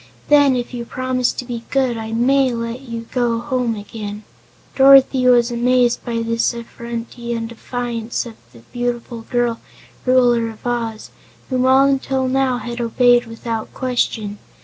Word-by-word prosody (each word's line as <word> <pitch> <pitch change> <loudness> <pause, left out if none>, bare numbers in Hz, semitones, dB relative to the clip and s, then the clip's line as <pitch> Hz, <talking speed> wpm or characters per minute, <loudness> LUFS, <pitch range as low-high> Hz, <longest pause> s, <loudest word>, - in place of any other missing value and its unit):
Then, 285 -3 +5
if 245 0 -4
you 240 -1 -4
promise 255 +1 -1
to 250 - -6
be 240 -2 -5
good, 260 -3 +1
I 220 0 -5
may 260 +3 +3
let 230 +2 -4
you 235 -3 -6
go 240 -2 +1
home 250 -3 -1
again." 210 0 -7 0.5
Dorothy 270 -1 +6
was 240 -1 +4
amazed 245 0 +2
by 230 -2 -2
this 230 +1 0
effrontery 235 0 -6
and 230 -1 -3
defiance 235 0 -4
of 235 - -8 0.2
the 115 -1 -17
beautiful 240 -1 -3
girl 240 0 -1 0.5
Ruler 245 -2 +3
of 220 +1 -13
Oz, 230 -3 -3 0.4
whom 255 0 +2
all 265 +1 +6
until 270 -1 0
now 260 -1 +1
had 240 0 -5
obeyed 240 +1 +3
without 230 -1 -5
question. 225 -5 -2
240 Hz, 150 wpm, -19 LUFS, 230-255 Hz, 0.5 s, Dorothy